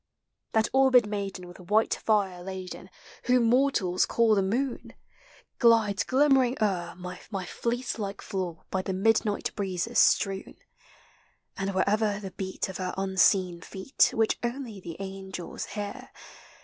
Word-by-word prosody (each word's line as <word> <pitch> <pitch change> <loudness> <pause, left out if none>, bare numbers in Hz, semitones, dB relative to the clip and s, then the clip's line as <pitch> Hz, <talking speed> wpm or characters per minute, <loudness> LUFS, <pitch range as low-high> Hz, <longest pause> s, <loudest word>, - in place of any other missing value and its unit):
i - - -56
fa - - -57
That - - -2
orbed 260 -3 +5
maiden 200 -3 -4
with 175 - -13
white 210 +5 +2
fire 195 -5 0
laden. 185 0 -7 0.4
Whom 250 0 +4
mortals 230 -7 +2
call 230 -2 +3
the 200 - +3
moon. 240 +7 -2 0.7
Glides 225 -5 +4
glimmering 265 -2 +3
o'er 185 -5 -1
my 180 +2 -7
fleece 240 +5 -3
like 200 -1 -4
floor 180 -4 -4
By 190 - 0
the 190 - -3
midnight 210 +1 +1
breezes 195 +2 -1
strewn; 195 -1 +2 1.0
And 195 0 -3
wherever 205 +2 +1
the 195 -2 -7
beat 190 0 -4
of 190 - -6
her 185 -1 -3
unseen 190 -2 +2
feet. 195 +8 +1
Which 225 -1 +1
only 240 -3 -4
the 170 -3 -8
angels 190 -2 -6
hear. 210 +5 -6
200 Hz, 140 wpm, -27 LUFS, 190-230 Hz, 1.0 s, orbed